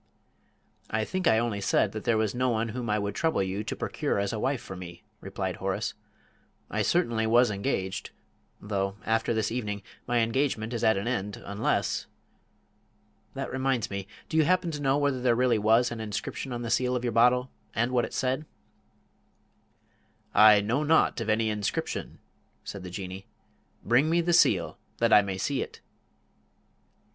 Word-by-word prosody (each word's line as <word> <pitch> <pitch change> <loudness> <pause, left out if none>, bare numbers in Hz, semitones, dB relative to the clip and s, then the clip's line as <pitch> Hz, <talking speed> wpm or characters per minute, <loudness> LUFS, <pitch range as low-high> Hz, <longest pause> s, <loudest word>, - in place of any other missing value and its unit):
"I 110 0 0
think 185 +4 -1
I 110 - +5
only 115 -3 -1
said 100 +1 +2
that 110 0 -7
there 115 - +3
was 110 -2 0
no 125 +1 +1
one 115 -1 0
whom 120 +1 -4
I 105 - +2
would 100 -1 -2
trouble 160 -9 +1
you 95 +2 -3
to - - -4
procure - - -2
as 100 +1 -1
a 110 - -2
wife 130 +3 0
for 95 - -9
me," 90 -2 -9 0.2
replied - - -4
Horace; - - -2 0.8
"I - - 0
certainly 110 -1 +1
was 120 0 +4
engaged 100 -2 -2 0.5
though, 100 -1 -2
after 115 +1 +1
this 110 -2 0
evening, 105 -4 -3 0.2
my 120 0 +1
engagement 115 -1 0
is 115 - -3
at 110 -2 +4
an 100 - -3
end 105 -5 -2
unless... 100 +1 -1 1.3
that - - -4
reminds 130 -4 0
me, 100 -1 -4 0.2
do 160 - -2
you 160 - +6
happen 180 +1 +2
to 150 -2 -5
know 135 0 +2
whether 140 -3 0
there 125 -2 +3
really 120 -2 +2
was 115 +3 +3
an 120 - -5
inscription 110 +4 -4
on 120 0 -4
the 115 - -3
seal 125 +2 +2
of 125 - -2
your 120 -2 -1
bottle, 125 +2 +4 0.2
and 120 +2 +1
what 125 -2 +2
it - - -4
said?" 130 +4 -1 1.9
"I 105 -1 +7
know 115 +8 0
naught 150 -5 +3
of 110 - -3
any 110 0 +2
inscription," 105 -2 -3 0.5
said 100 - -7
the 90 - -7
Jinnee; 95 +1 -7 0.6
"bring 125 +7 +3
me 170 +1 +3
the 175 +1 +1
seal 95 - +3 0.2
that 115 0 +3
I 105 - +9
may 100 -2 -4
see 130 +8 -1
it." - - -7
115 Hz, 180 wpm, -28 LUFS, 105-125 Hz, 1.9 s, I